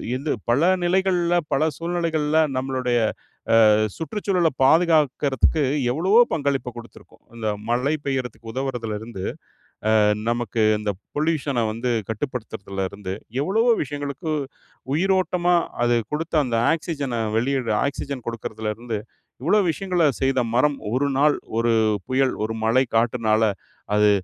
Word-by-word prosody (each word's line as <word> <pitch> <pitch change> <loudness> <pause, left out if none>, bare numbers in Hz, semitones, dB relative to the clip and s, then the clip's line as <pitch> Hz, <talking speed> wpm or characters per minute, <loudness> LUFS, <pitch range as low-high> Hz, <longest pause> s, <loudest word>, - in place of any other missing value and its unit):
இந்து 140 +4 -2 0.2
பல 145 +9 +4
நிலைகள்ல 175 -1 +2 0.2
பல 135 +2 +2
சூழ்நிலைகள்ல 165 -2 -1 0.2
நம்மளுடைய 130 -2 0 0.7
அ - - +6 0.3
சுற்றுச்சூழல 180 +1 0
பாதுகாக்கறதுக்கு 150 -1 +3 0.3
எவ்வளவோ 185 - +4
பங்களிப்ப 140 -4 -1
குடுத்திருக்கும். 120 0 -13
இந்த 110 -2 -2 0.2
மழை 125 +5 +1
பெய்யறதுக்கு 125 -4 -3
உதவரதுல 125 -5 -3
இருந்து, 110 -4 -8 0.8
அ - - +5 0.3
நமக்கு 120 -2 -1 0.2
இந்த 105 -1 -2 0.2
பொல்யூஷன 145 -5 0
வந்து 120 +2 -2 0.2
கட்டுப்படுத்துறதலிருந்து 100 -5 -4 0.3
எவ்வளவோ 225 +8 +3
விஷயங்களுக்கு 145 +2 -4 0.6
உயிரோட்டமா 180 0 +2 0.3
அது 120 0 +3 0.2
கொடுத்த, 160 +3 -3
அந்த 120 -3 -1 0.2
ஆக்சிஜன 145 -6 -4 0.2
வெளியிட 125 -1 0
ஆக்ஸிஜன் 140 -2 -5
கொடுக்குறதுலருந்து 110 0 -4 0.5
இவ்ளோ 205 +7 +4
விஷயங்கள 180 0 0 0.2
செய்த 135 -1 +2
மரம் 140 +4 +3 0.2
ஒரு 135 +3 +1
நாள் 150 +1 +4 0.2
ஒரு 115 0 +2 0.3
புயல் 130 0 +1
ஒரு 110 +1 -3
மழை 125 +4 +3
காற்றுனால 115 -1 +2 0.5
அது 105 0 +5
135 Hz, 110 wpm, -23 LUFS, 120-160 Hz, 0.8 s, அ